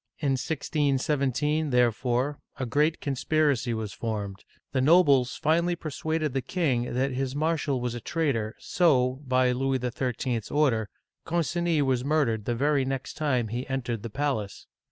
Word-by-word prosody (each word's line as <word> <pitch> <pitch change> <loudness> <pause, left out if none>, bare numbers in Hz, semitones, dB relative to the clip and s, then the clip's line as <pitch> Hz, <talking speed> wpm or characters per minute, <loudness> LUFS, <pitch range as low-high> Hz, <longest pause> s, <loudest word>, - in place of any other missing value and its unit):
In 140 -3 0
1617, 145 +1 0
therefore, 125 +3 +1 0.2
a 130 - -2
great 150 +6 +1
conspiracy 140 -2 +1
was 110 -3 -3
formed; 100 -3 -4 0.3
the 130 - +1
nobles 140 -4 +5
finally 170 +3 +1
persuaded 155 -2 -2
the 135 - 0
king 125 -9 -1
that 135 +2 +1
his 130 +1 -2
marshal 155 -3 0
was 120 -1 -2
a 120 - -6
traitor, 130 -10 -1
so, 130 -6 +2
by 130 0 +3
Louis 135 +1 0
XIII. 125 0 -2
's - - -12
order, 125 -8 +1 0.3
Concini 170 -1 0
was 130 -2 +1
murdered 135 -8 +1
the 120 - 0
very 140 +2 +2
next 135 0 -3
time 130 -7 0
he 120 +4 -4
entered 125 -4 -2
the 115 - -6
palace. 120 -5 -2
135 Hz, 150 wpm, -27 LUFS, 125-150 Hz, 0.3 s, nobles